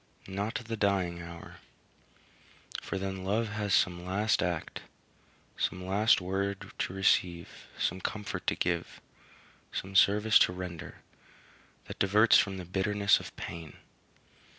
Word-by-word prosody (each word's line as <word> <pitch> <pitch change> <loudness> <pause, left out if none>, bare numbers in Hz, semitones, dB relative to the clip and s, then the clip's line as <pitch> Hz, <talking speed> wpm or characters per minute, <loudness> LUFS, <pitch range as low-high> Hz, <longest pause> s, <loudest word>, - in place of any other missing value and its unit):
Not 100 +4 -3
the 115 0 -3
dying 95 -5 0
hour; 85 0 -10 1.2
for - - -4
then 95 -1 -4
love 105 +4 0
has 105 -1 -3
some 90 -1 +1
last 100 +4 +1
act, 85 -2 -3 0.8
some 90 0 -2
last 105 +4 +4
word 95 +1 -3
to - - -1
receive, 90 -2 0
some 95 +2 -1
comfort 105 0 -4
to - - +2
give, 85 -1 -2 0.7
some 95 +1 -5
service 105 +3 +6
to - - +3
render, 85 -2 -7 0.8
that - - -9
diverts 105 +4 +5
from 100 -3 0
the 90 - -6
bitterness 100 +2 +2
of - - -10
pain. 85 -3 -7
95 Hz, 130 wpm, -30 LUFS, 90-105 Hz, 1.2 s, service